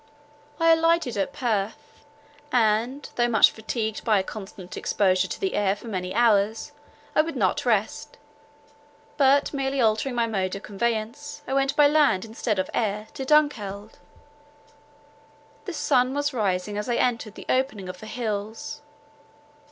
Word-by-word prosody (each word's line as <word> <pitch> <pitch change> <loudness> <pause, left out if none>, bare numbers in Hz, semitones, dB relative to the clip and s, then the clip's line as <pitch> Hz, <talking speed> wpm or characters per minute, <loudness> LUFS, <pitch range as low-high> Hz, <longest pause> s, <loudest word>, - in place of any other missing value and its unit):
I 330 0 +5
alighted 330 -5 +2
at 200 +6 -1
Perth; 220 -6 -3 0.5
and, 240 +3 +1
though 240 0 +3
much 220 -3 +5
fatigued 220 0 -4
by 215 -2 +3
a 190 - +1
constant 190 -3 -9
exposure 185 -2 +1
to - - -6
the 385 -1 -1
air 200 -1 +1
for 220 - -12
many 185 -4 -3
hours, 220 +2 +2 0.4
I - - +6
would 320 0 -5
not 245 +4 0
rest, 215 -2 -1 1.0
but 280 0 +4
merely 275 -1 -1
altering 230 +3 +1
my 235 -1 +2
mode 190 -4 -2
of 195 - -8
conveyance, 225 +6 -3
I - - -2
went 275 0 +1
by 295 - +6
land 285 -10 +3
instead 220 -1 -2
of 185 0 0
air, 215 -1 -1
to 265 - -5
Dunkeld. 220 -9 +1 1.7
The 375 - -5
sun 260 -4 +2
was 290 0 -1
rising 205 -2 -1
as 210 - -4
I 240 - +1
entered 230 -4 0
the - - -10
opening 255 -7 0
of 185 0 -7
the 215 - -10
hills. 220 +4 -4
225 Hz, 150 wpm, -25 LUFS, 205-270 Hz, 1.7 s, I